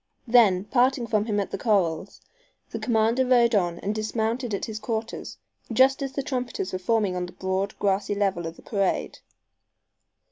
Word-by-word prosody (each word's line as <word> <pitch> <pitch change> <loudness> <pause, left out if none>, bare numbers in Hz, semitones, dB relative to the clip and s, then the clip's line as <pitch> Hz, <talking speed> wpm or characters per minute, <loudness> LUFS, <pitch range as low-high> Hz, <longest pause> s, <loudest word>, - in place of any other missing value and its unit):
Then, 225 -7 +5
parting 250 +3 +2
from 215 -2 0
him 210 -2 0
at 200 - -3
the - - -4
corrals, 190 -5 0 0.5
the - - -4
commander 230 +1 +2
rode 245 -2 +4
on 175 -4 +1
and 205 - -1
dismounted 220 +3 -2
at 200 - -2
his 215 -1 -6
quarters 220 +1 -4 0.3
just 260 +4 +4
as 270 -1 -3
the 275 - -2
trumpeters 250 -8 -3
were 185 - -2
forming 205 -1 +1
on 180 0 -2
the - - -13
broad, 190 +1 -2
grassy 200 0 0
level 195 -4 0
of 165 - -7
the - - -17
parade. 195 -3 -1
215 Hz, 175 wpm, -25 LUFS, 195-240 Hz, 0.5 s, Then